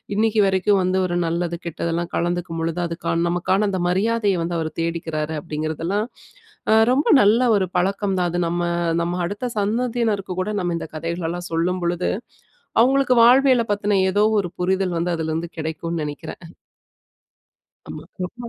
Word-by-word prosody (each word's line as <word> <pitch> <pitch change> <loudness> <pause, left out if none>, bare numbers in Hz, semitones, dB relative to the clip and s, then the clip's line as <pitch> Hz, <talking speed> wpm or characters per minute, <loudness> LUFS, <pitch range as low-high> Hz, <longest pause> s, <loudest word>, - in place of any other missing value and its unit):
இன்னிக்கு 220 0 +2
வரைக்கும் 195 +1 +2
வந்து 185 +1 +1
ஒரு 175 - -2
நல்லது 170 +1 -1
கெட்டதெல்லா 170 +1 -2
கலந்துக்கும் 175 -1 -2
பொழுது, 165 +1 -2
அதுக்கான 170 0 -1
நமக்கான 185 +4 +1
அந்த 185 -2 -2
மரியாதய 200 -1 +1
வந்து 170 0 -2
அவரு 160 -1 -3
தேடிக்கிறாரு. 160 -2 -3
அப்டிங்குறதெல்லாம், 160 +8 -2 0.6
அ - - +6 0.2
ரொம்ப 280 +4 +1
நல்ல 215 +4 +4 0.2
ஒரு 190 -2 +1
பழக்கம் 195 +2 0
தான். 180 -1 +1
அது 175 - -2
நம்ம 175 +1 -1 0.4
நம்ம 175 +1 -1
அடுத்த 205 +8 -3
சந்ததியினருக்கு 220 -2 -1
கூட 185 +3 -2
நம்ம 175 -1 -1
இந்த 160 - -7
கதைகள்லாம் 170 +2 -4
சொல்லும்பொழுது, 175 +1 0 0.7
அவங்களுக்கு 260 +1 +3
வாழ்வியல 255 0 +5
பத்தின 205 -1 +1
ஏதோ 205 +2 +2 0.2
ஒரு 180 -3 -4
புரிதல் 185 -1 0
வந்து 175 +1 -1
அதுலருந்து 160 +1 -3
கெடைக்கும்னு 160 +1 -3
நெனைக்குறன். 160 +3 -8 1.3
ஆமா. 235 +6 -7
180 Hz, 140 wpm, -22 LUFS, 170-205 Hz, 1.3 s, அ